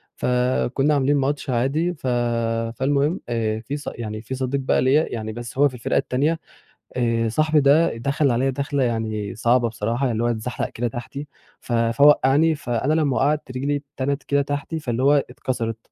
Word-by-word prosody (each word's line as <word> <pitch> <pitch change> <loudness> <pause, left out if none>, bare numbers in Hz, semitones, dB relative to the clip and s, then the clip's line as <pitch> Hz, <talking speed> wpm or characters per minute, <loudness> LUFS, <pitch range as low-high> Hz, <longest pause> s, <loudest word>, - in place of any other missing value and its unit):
فكنّا 125 +3 +1
عاملين 140 +1 +2
ماتش 140 +1 -1
عادي 140 +8 0
ف 145 -5 -7 0.7
فالمهم 140 +5 +1
آآ، 110 -2 -1
في 135 +6 -5
ص 145 - -10
يعني 110 -2 -5
في 125 +4 -5
صديق 130 +1 -1
بقى 130 - +1
ليّا 140 +5 +3
يعني 110 -1 -4
بس 120 +2 -8
هو 145 +1 +5
في 130 - -16
الفرقة 115 - -1
التانية، 150 +6 0 0.6
آآ، 115 -2 +1
صاحبي 155 +5 +2
ده 145 0 +4
دخل 140 +2 +1
عليَّ 130 +3 +1
داخلة 140 +1 -1
يعني 110 -4 -2
صعبة 120 +1 +2
بصراحة 115 +4 -1
يعني 115 -1 -1
هو - - +2
اتزحلق 120 +1 -2
كده 120 +1 -3
تحتي، 130 +5 -6 0.3
ف 120 - -5
فوقعني 140 +6 +4
فأنا 130 +2 -1
لمّا 150 -5 +1
وقعت 145 0 +1
رجلي 140 +3 -1 0.2
اتنت 140 +2 -1
كده 140 0 +1
تحتي 145 +3 -3
فاللي 125 -3 -2
هو 140 +2 +5 0.2
اتكسرت 125 -3 -3
130 Hz, 175 wpm, -22 LUFS, 120-145 Hz, 0.7 s, هو